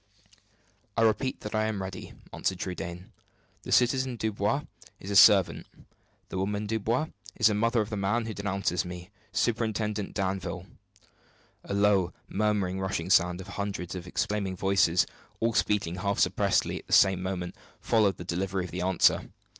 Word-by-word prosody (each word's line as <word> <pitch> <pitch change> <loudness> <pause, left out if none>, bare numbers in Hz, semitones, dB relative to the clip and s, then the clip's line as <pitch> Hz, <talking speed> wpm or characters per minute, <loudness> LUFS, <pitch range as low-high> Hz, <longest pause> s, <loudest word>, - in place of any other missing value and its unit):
"I 115 - +4
repeat 115 +4 +1
that 105 - -6
I 110 0 +1
am 110 -2 -2
ready," 95 0 -6 0.2
answered 95 - -1
Trudaine. 90 -1 -6 0.5
"The - - -8
citizen 130 +1 +3
Dubois 110 +5 -1 0.4
is 100 - -7
a - - -1
servant. 95 -1 +6 0.6
The 95 - -3
woman 100 +2 -1
Dubois 115 +7 -1 0.3
is 110 - 0
the 105 - +6
mother 115 +2 +2
of 105 +2 -5
the 105 - -2
man 105 +4 0
who 110 - -4
denounces 95 -4 -1
me 90 +2 -8 0.2
Superintendent 110 -2 -1
Danville." 95 -1 -2 1.0
A 100 - -4
low, 100 -3 +3
murmuring, 100 -2 0
rushing 95 -2 -2
sound 90 0 +4
of 95 - -11
hundreds 100 -3 -4
of 90 -1 -7
exclaiming 100 0 -1
voices, 90 -3 +3 0.3
all 115 0 +1
speaking, 100 -5 0
half 100 +2 -1
suppressedly, - - +1
at - - -18
the - - -3
same 95 -2 +5
moment, 90 -1 -3 0.3
followed 105 -5 +2
the - - -7
delivery 95 +1 -2
of 90 - -9
the 90 - -4
answer. 90 -1 +3
100 Hz, 160 wpm, -28 LUFS, 95-110 Hz, 1.0 s, servant